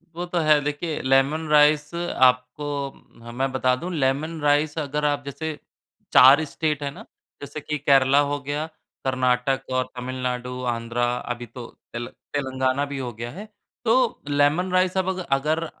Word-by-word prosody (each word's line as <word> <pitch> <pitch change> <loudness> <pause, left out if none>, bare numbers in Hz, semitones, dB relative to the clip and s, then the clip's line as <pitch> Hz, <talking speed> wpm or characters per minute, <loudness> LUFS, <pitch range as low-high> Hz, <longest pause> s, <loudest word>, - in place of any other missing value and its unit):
वो 175 +1 -3
तो 175 0 -3
है, 155 -2 +4
देखिए 150 +2 -3
लेमन 135 +4 +2
राइस 150 0 +4
आपको 130 -4 +1 0.6
ह 115 - -9
मैं 130 +3 -1
बता 130 -1 +2
दूँ, 170 +8 -6
लेमन 150 +2 -1
राइस 145 +1 +2
अगर 150 0 -2
आप 145 -1 0
जैसे 140 +3 -4 0.6
4 135 +5 +8
स्टेट 150 -1 -2
है 140 - -1
ना, - - -12 0.4
जैसे 145 +2 -6
कि 150 +1 -3
केरला 140 -1 +4
हो 145 - -1
गया, 145 +2 -3 0.4
कर्नाटक 130 0 +1
और 130 0 +1
तमिलनाडु, 125 0 -4
आंध्रा, 115 0 -1
अभी 120 0 -5
तो 120 +1 -9 0.3
तेल 120 0 -4 0.3
तेलंगाना 130 0 0
भी 140 -1 -6
हो 125 -2 -4
गया 115 +2 -6
है। 205 - -9 0.4
तो - - +2
लेमन 145 +6 +2
राइस 185 0 +2
अब 190 0 +1
अग 185 0 -2
अगर 155 +4 +1
145 Hz, 165 wpm, -24 LUFS, 130-155 Hz, 0.6 s, 4